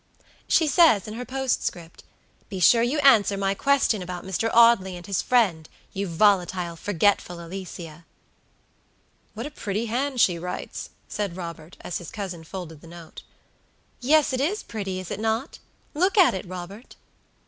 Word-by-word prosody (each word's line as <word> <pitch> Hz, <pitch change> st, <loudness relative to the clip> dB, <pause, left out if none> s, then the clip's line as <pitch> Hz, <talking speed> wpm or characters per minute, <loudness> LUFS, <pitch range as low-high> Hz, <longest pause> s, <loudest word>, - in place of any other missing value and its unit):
"She 325 Hz, -, +4 dB
says 290 Hz, -, +4 dB
in 215 Hz, -, -6 dB
her 245 Hz, +3 st, -6 dB
postcript, 245 Hz, -10 st, -3 dB, 0.5 s
'Be 195 Hz, -2 st, -5 dB
sure 230 Hz, +6 st, +6 dB
you 245 Hz, +6 st, 0 dB
answer 220 Hz, -8 st, +5 dB
my 195 Hz, 0 st, 0 dB
question 270 Hz, -3 st, +2 dB
about 180 Hz, 0 st, -6 dB
Mr. 190 Hz, +4 st, -1 dB
Audley 230 Hz, -5 st, +5 dB
and 175 Hz, -, -11 dB
his 195 Hz, -2 st, -1 dB
friend, 190 Hz, -11 st, +1 dB, 0.2 s
you 200 Hz, +1 st, -3 dB
volatile, 180 Hz, -1 st, +1 dB
forgetful 180 Hz, 0 st, 0 dB
Alicia!'" 170 Hz, -2 st, -8 dB, 1.3 s
"What 230 Hz, +3 st, -5 dB
a 295 Hz, -, -6 dB
pretty 215 Hz, -3 st, -3 dB
hand 255 Hz, +3 st, -2 dB
she 175 Hz, -6 st, +3 dB
writes!" 180 Hz, +1 st, -6 dB, 0.2 s
said 200 Hz, -5 st, -4 dB
Robert, 170 Hz, -2 st, -8 dB
as 175 Hz, -, -4 dB
his 175 Hz, -, -9 dB
cousin 185 Hz, -6 st, -6 dB
folded 165 Hz, -3 st, -8 dB
the -, -, -14 dB
note. 170 Hz, -1 st, -11 dB, 0.8 s
"Yes, 295 Hz, +2 st, +3 dB
it 255 Hz, -, 0 dB
is 375 Hz, +9 st, -1 dB
pretty, 195 Hz, -4 st, -5 dB
is 185 Hz, -, -8 dB
it 205 Hz, -, -4 dB
not? 225 Hz, +4 st, -2 dB, 0.3 s
Look 370 Hz, +7 st, +1 dB
at 370 Hz, -4 st, +6 dB
it, 190 Hz, -1 st, -5 dB
Robert." 185 Hz, +6 st, -9 dB
195 Hz, 160 wpm, -25 LUFS, 175-235 Hz, 1.3 s, sure